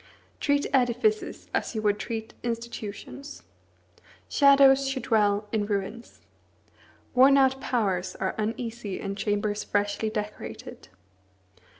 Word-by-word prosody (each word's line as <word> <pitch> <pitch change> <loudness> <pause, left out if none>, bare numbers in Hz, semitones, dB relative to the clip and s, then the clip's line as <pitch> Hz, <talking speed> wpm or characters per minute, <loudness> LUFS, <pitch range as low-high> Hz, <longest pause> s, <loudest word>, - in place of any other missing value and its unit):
Treat 285 0 +1
edifices 265 - +1
as - - -1
you 215 - -2
would 205 0 +2
treat 220 -1 -5
institutions. 235 +4 -6 0.8
Shadows 275 -1 +5
should 265 -3 -3
dwell 210 -3 +2
in 210 -2 0
ruins. 205 +3 -4 0.9
Worn 270 +2 +6
out 265 0 +3
powers 190 -8 -1
are 190 - -2
uneasy 225 -2 -3
in 195 0 -4
chambers 205 0 -1
freshly 205 +1 -1
decorated. 210 - -6
225 Hz, 105 wpm, -27 LUFS, 205-260 Hz, 0.9 s, Worn